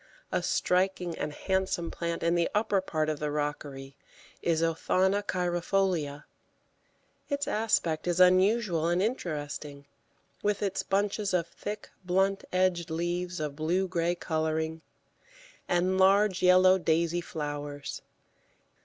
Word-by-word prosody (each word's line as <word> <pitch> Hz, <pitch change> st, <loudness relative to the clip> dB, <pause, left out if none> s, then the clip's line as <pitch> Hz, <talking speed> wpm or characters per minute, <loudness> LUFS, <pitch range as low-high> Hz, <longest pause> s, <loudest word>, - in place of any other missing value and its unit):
A -, -, +1 dB
striking 180 Hz, -2 st, 0 dB
and 150 Hz, -, -3 dB
handsome 190 Hz, 0 st, -1 dB
plant 170 Hz, -1 st, -3 dB
in 170 Hz, 0 st, +2 dB
the 170 Hz, -1 st, +2 dB
upper 205 Hz, -2 st, +2 dB
part 155 Hz, -4 st, -1 dB
of 155 Hz, -2 st, -2 dB
the 150 Hz, -, -2 dB
rockery 145 Hz, -2 st, -4 dB, 0.5 s
is 165 Hz, -1 st, +1 dB
Othonna 185 Hz, +4 st, +1 dB
cheirifolia; 175 Hz, -5 st, -1 dB, 1.1 s
its 285 Hz, 0 st, -1 dB
aspect 180 Hz, -7 st, 0 dB
is 175 Hz, 0 st, +1 dB
unusual 185 Hz, -1 st, +4 dB
and 175 Hz, +1 st, +2 dB
interesting, 150 Hz, -, -3 dB, 0.6 s
with 210 Hz, 0 st, 0 dB
its 195 Hz, -2 st, -1 dB
bunches 200 Hz, 0 st, 0 dB
of 170 Hz, -2 st, +1 dB
thick, 205 Hz, +4 st, -7 dB
blunt 190 Hz, +2 st, +1 dB
edged 185 Hz, -2 st, +1 dB
leaves 175 Hz, +2 st, -2 dB
of 150 Hz, -2 st, -3 dB
blue 170 Hz, +5 st, 0 dB
grey 175 Hz, -1 st, 0 dB
colouring, 160 Hz, -1 st, -2 dB, 0.9 s
and 180 Hz, +2 st, +2 dB
large 195 Hz, 0 st, +4 dB
yellow 185 Hz, +1 st, +6 dB
daisy 170 Hz, +1 st, +1 dB
flowers. 145 Hz, -3 st, -5 dB
175 Hz, 120 wpm, -29 LUFS, 160-190 Hz, 1.1 s, yellow